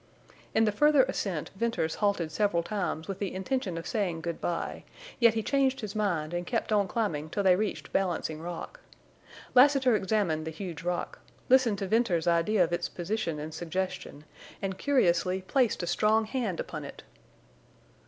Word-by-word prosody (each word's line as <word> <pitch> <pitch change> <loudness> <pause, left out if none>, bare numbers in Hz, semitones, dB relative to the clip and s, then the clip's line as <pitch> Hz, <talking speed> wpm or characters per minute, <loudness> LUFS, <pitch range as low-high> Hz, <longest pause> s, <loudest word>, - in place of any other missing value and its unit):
In 225 0 +5
the 210 - +2
further 295 +5 +5
ascent 195 - -3
Venters 230 -7 -1
halted 200 -6 +1
several 200 -4 +1
times 175 -5 -3
with 195 -1 -5
the 200 -3 -2
intention 190 -2 -2
of 165 - -6
saying 180 -7 -1
good 170 0 -4
by, 170 - -3 0.4
yet 235 -2 +5
he 220 - 0
changed 270 +1 +1
his 215 -2 -5
mind 175 -7 -1
and 175 0 -3
kept 230 -2 -1
on 205 -2 +3
climbing 170 -8 -2
till 200 +5 -1
they 185 -2 +6
reached 210 +2 -3
Balancing 170 -4 -1
Rock. 175 - -7 0.7
Lassiter 265 -2 +6
examined 190 -6 0
the - - -1
huge 165 -1 -6
rock, 175 +1 -3 0.3
listened 250 -5 +5
to 195 - -3
Venters's 185 -6 +2
idea 175 +4 +3
of 175 0 -2
its 175 0 -1
position 175 -3 -3
and 155 +1 -6
suggestion, 175 -3 -4 0.4
and 195 -1 -3
curiously 185 -8 +2
placed 240 -2 +1
a - - 0
strong 215 +5 +2
hand 215 -6 -2
upon - - -5
it. - - -10
195 Hz, 170 wpm, -29 LUFS, 170-220 Hz, 0.7 s, they